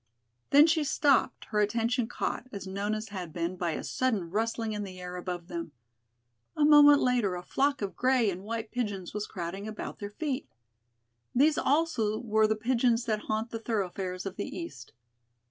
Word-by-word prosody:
Then 290 Hz, +2 st, +8 dB
she 320 Hz, -1 st, +2 dB
stopped, 290 Hz, -1 st, +2 dB
her 210 Hz, -, 0 dB
attention 230 Hz, +3 st, +1 dB
caught, 245 Hz, -, -3 dB
as 200 Hz, -1 st, -6 dB
Nona's 205 Hz, +3 st, -3 dB
had 185 Hz, -5 st, -6 dB
been, 170 Hz, +2 st, -2 dB
by 175 Hz, -3 st, -1 dB
a -, -, -4 dB
sudden 215 Hz, -10 st, -1 dB
rustling 225 Hz, +1 st, -1 dB
in 210 Hz, 0 st, -3 dB
the 185 Hz, -2 st, -8 dB
air 180 Hz, 0 st, -6 dB
above 180 Hz, -1 st, -5 dB
them. 170 Hz, -4 st, -5 dB, 0.8 s
A 300 Hz, -, +4 dB
moment 290 Hz, -1 st, +8 dB
later 240 Hz, -7 st, +2 dB
a 180 Hz, -, -6 dB
flock 275 Hz, +4 st, 0 dB
of 195 Hz, -, -4 dB
gray 255 Hz, -4 st, +3 dB
and 185 Hz, +1 st, -7 dB
white 225 Hz, +1 st, -4 dB
pigeons 205 Hz, -7 st, -3 dB
was 210 Hz, 0 st, -3 dB
crowding 190 Hz, +3 st, -5 dB
about 215 Hz, -, -6 dB
their 205 Hz, -, -5 dB
feet. 275 Hz, +4 st, -3 dB, 0.9 s
These 295 Hz, +4 st, +4 dB
also 275 Hz, -9 st, +1 dB
were 220 Hz, -2 st, +2 dB
the 220 Hz, -, +1 dB
pigeons 235 Hz, +1 st, +1 dB
that 215 Hz, -2 st, -1 dB
haunt 220 Hz, +2 st, -1 dB
the 225 Hz, -, -4 dB
thoroughfares 190 Hz, -4 st, -3 dB
of 195 Hz, -1 st, -5 dB
the 205 Hz, -, -4 dB
east. 335 Hz, -, -8 dB
215 Hz, 180 wpm, -29 LUFS, 190-250 Hz, 0.9 s, Then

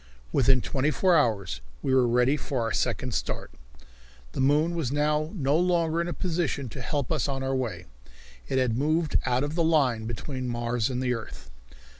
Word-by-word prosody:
Within 130 Hz, -1 st, +4 dB
twenty 140 Hz, +4 st, 0 dB
four 180 Hz, +3 st, +3 dB
hours 105 Hz, -, +1 dB, 0.2 s
we 130 Hz, -, +1 dB
were 130 Hz, -2 st, +4 dB
ready 125 Hz, +4 st, +3 dB
for 135 Hz, -4 st, -3 dB
our 115 Hz, -, -1 dB
second -, -, -1 dB
start. -, -, -3 dB, 0.8 s
The -, -, -6 dB
moon 150 Hz, +5 st, +3 dB
was 160 Hz, -7 st, -2 dB
now 150 Hz, +1 st, +1 dB
no 140 Hz, -4 st, +1 dB
longer 170 Hz, -1 st, +2 dB
in 170 Hz, -, -2 dB
a -, -, -2 dB
position 160 Hz, -7 st, -2 dB
to -, -, -8 dB
help 145 Hz, -4 st, -2 dB
us -, -, +1 dB
on 135 Hz, -1 st, -2 dB
our 135 Hz, 0 st, 0 dB
way. 110 Hz, -9 st, -3 dB, 0.6 s
It 130 Hz, -, -1 dB
had 125 Hz, -3 st, +2 dB
moved 155 Hz, +2 st, +1 dB
out 125 Hz, +1 st, +2 dB
of 145 Hz, +1 st, -3 dB
the 170 Hz, 0 st, +1 dB
line 135 Hz, -9 st, +2 dB
between 130 Hz, +3 st, -4 dB
Mars 120 Hz, -1 st, -1 dB
and 130 Hz, 0 st, -2 dB
the 125 Hz, -1 st, +1 dB
earth. 110 Hz, -, -8 dB
135 Hz, 190 wpm, -27 LUFS, 125-155 Hz, 0.8 s, Within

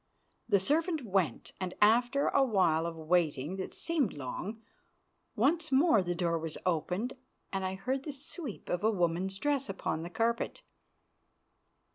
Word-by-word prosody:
The 205 Hz, -, +6 dB
servant 310 Hz, -, 0 dB
went, 185 Hz, -, 0 dB
and, 185 Hz, -1 st, -4 dB
after 240 Hz, +6 st, +4 dB
a 275 Hz, -, +4 dB
while 175 Hz, -9 st, +2 dB
of 170 Hz, -, -5 dB
waiting 160 Hz, -1 st, 0 dB
that 190 Hz, -, -4 dB
seemed 310 Hz, -, +1 dB
long, 160 Hz, -, -5 dB, 0.8 s
once 310 Hz, +7 st, +2 dB
more 265 Hz, -, +5 dB
the 175 Hz, -1 st, -2 dB
door 170 Hz, -1 st, 0 dB
was 160 Hz, -1 st, -5 dB
opened, 180 Hz, -, 0 dB, 0.4 s
and 190 Hz, 0 st, -1 dB
I 185 Hz, 0 st, -2 dB
heard 260 Hz, +7 st, -2 dB
the 295 Hz, -, -5 dB
sweep 280 Hz, -, -6 dB
of 180 Hz, +2 st, -1 dB
a 220 Hz, -, +5 dB
woman's 185 Hz, -1 st, 0 dB
dress 275 Hz, +3 st, 0 dB
upon 190 Hz, -4 st, -2 dB
the 170 Hz, -, -5 dB
carpet. 230 Hz, +5 st, -1 dB
195 Hz, 150 wpm, -31 LUFS, 175-265 Hz, 0.8 s, The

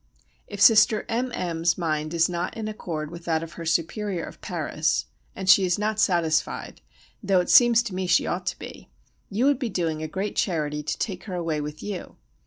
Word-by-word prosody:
If 205 Hz, -, -8 dB
Sister 215 Hz, 0 st, +6 dB
M. 245 Hz, +3 st, -1 dB
M.'s 170 Hz, -1 st, 0 dB
mind 155 Hz, -2 st, -2 dB
is 165 Hz, 0 st, +4 dB
not 180 Hz, +5 st, -3 dB
in 220 Hz, -1 st, -4 dB
accord 165 Hz, -8 st, -5 dB
with 170 Hz, 0 st, -10 dB
that 160 Hz, -1 st, 0 dB
of 165 Hz, -, -8 dB
her 165 Hz, -1 st, -7 dB
superior 175 Hz, +3 st, -1 dB
of -, -, -10 dB
Paris, 160 Hz, -2 st, -1 dB, 0.3 s
and 190 Hz, 0 st, -6 dB
she 195 Hz, 0 st, +7 dB
is 180 Hz, -1 st, +1 dB
not 215 Hz, +1 st, -1 dB
satisfied, 170 Hz, -6 st, 0 dB, 0.4 s
though 195 Hz, -3 st, +2 dB
it 180 Hz, -, 0 dB
seems 240 Hz, -1 st, +6 dB
to 230 Hz, -, -6 dB
me 185 Hz, 0 st, -2 dB
she 175 Hz, -, +3 dB
ought 180 Hz, 0 st, -3 dB
to -, -, -2 dB
be, -, -, -10 dB, 0.4 s
you 220 Hz, +6 st, 0 dB
would 280 Hz, -2 st, +3 dB
be 250 Hz, -4 st, -2 dB
doing 165 Hz, -5 st, -2 dB
a 155 Hz, -, -3 dB
great 190 Hz, +6 st, -4 dB
charity 150 Hz, -5 st, -1 dB
to 150 Hz, -, -3 dB
take 190 Hz, -4 st, -4 dB
her 190 Hz, -4 st, -5 dB
away 165 Hz, -3 st, -2 dB
with 150 Hz, +1 st, -7 dB
you. 205 Hz, -3 st, -6 dB
180 Hz, 205 wpm, -25 LUFS, 160-210 Hz, 0.4 s, she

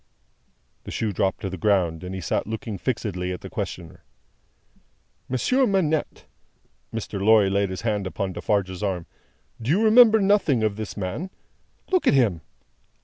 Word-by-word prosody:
The -, -, -9 dB
shoe 110 Hz, -2 st, -2 dB
dropped 95 Hz, +1 st, -1 dB
to 95 Hz, -, -3 dB
the 95 Hz, -, -6 dB
ground, 90 Hz, -6 st, +1 dB
and 90 Hz, +1 st, -5 dB
he 95 Hz, -, -5 dB
sat 80 Hz, -, -1 dB
looking 110 Hz, -2 st, -5 dB
fixedly 90 Hz, -7 st, -2 dB
at 90 Hz, -, -6 dB
the -, -, -9 dB
questioner. 85 Hz, -2 st, -6 dB, 1.3 s
"Monsieur 255 Hz, -, +2 dB
Manette"; 165 Hz, -7 st, 0 dB, 0.7 s
Mr. 105 Hz, -3 st, -4 dB
Lorry 105 Hz, -2 st, +5 dB
laid 100 Hz, 0 st, +1 dB
his 95 Hz, -, -5 dB
hand 105 Hz, -4 st, -1 dB
upon 95 Hz, 0 st, -3 dB
Defarge's 95 Hz, -3 st, -1 dB
arm; 95 Hz, -5 st, -2 dB, 0.6 s
"do 115 Hz, -, -4 dB
you 190 Hz, +9 st, +3 dB
remember 220 Hz, 0 st, +7 dB
nothing 195 Hz, -, +2 dB
of 105 Hz, -2 st, 0 dB
this 110 Hz, 0 st, -6 dB
man? 105 Hz, -, -4 dB, 0.6 s
Look 370 Hz, -2 st, +2 dB
at -, -, +5 dB
him. 105 Hz, -11 st, +2 dB
105 Hz, 155 wpm, -24 LUFS, 95-135 Hz, 1.3 s, remember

